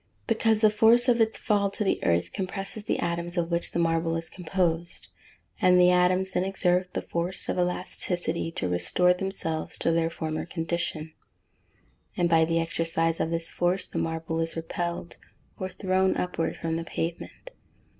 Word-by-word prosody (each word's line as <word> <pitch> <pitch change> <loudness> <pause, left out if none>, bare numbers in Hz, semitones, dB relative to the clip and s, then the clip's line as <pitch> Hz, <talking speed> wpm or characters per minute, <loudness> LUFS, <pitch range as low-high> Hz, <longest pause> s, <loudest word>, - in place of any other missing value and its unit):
_ - - -44 0.2
Because 225 -1 +2
the 215 -1 +6
force 225 +4 +5
of 240 -2 +4
its 225 0 +2
fall 200 -1 +1
to 200 +2 -3
the 195 - 0
earth 85 +1 +1
compresses 195 +2 -3
the - - 0
atoms 170 +1 -2
of 170 0 0
which 170 0 0
the - - -4
marble 165 0 +1
is 165 0 -4
composed; 170 - -2 0.5
and 180 0 +5
the 180 0 +6
atoms 180 +1 +3
then 180 - 0
exert 180 -1 0
the - - -2
force 170 +2 -2
of - - -1
elasticity 175 -2 -1
to 90 - -2
restore 90 - +3
themselves 180 -4 -2
to - - +1
their 165 0 +1
former 155 -1 -4
condition; 165 -2 -3 1.0
and 175 -1 +2
by 165 -1 +5
the 165 +1 +1
exercise 165 0 0
of - - 0
this 165 0 0
force 180 +2 0
the - - -4
marble 165 0 -2
is 165 0 -1
repelled, 170 +1 -4 0.4
or 185 - -3
thrown 190 0 +1
upward 180 -2 -2
from 165 0 -2
the 165 - -3
pavement. 165 - -5
175 Hz, 175 wpm, -27 LUFS, 165-185 Hz, 1.0 s, the